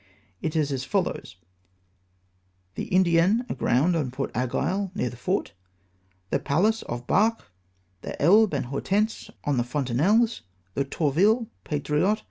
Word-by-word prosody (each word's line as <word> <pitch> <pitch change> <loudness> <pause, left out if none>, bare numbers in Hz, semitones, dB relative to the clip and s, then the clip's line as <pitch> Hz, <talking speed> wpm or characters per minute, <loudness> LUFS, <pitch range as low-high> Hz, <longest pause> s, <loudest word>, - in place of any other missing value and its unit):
It 160 0 -3
is 150 -2 +1
as 130 -2 -2
follows: 180 - -2 0.5
— 90 0 -42
" 90 0 -42
The - - -5
Indienne 185 +5 +3
aground 155 +9 +1
on 150 -6 -1
Point 130 +2 -4
Aiguille, 185 - -1
near 125 - -1
the - - -10
fort; 185 +11 -2 0.8
the - - +2
Pallas 205 +10 +1
off 120 0 -4
Barques; 225 - +2 0.6
the - - -7
Elbe 195 +3 +5
and 135 - -1
Hortense 200 - -1
on 145 -3 0
the 120 - +2
Fontenelles; 150 - +1 0.3
the 140 - -1
Tourville, 195 - +1
Patriote. 150 +7 0
150 Hz, 140 wpm, -25 LUFS, 125-200 Hz, 0.8 s, Elbe